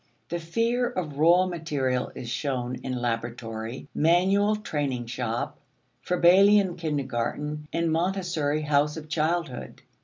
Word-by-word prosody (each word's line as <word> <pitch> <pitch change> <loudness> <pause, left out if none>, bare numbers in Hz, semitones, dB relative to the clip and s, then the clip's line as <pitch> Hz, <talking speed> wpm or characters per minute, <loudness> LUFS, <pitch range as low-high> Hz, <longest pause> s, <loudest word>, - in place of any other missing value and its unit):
The 170 - -2
fear 230 +9 0
of 150 -6 -4
raw 175 +4 +6
material 145 -8 -1
is 120 - -7
shown 125 0 -2
in 130 - -3
laboratory, 115 0 -4
manual 190 +6 +3
training 145 - -2
shop, 115 -1 -3 0.4
Froebelian 185 +2 +5
kindergarten, 150 -1 -3
and 165 -1 0
Montessori 165 -4 0
house 150 +1 +2
of 155 -1 -8
childhood. 160 -3 -2
155 Hz, 115 wpm, -26 LUFS, 130-175 Hz, 0.4 s, raw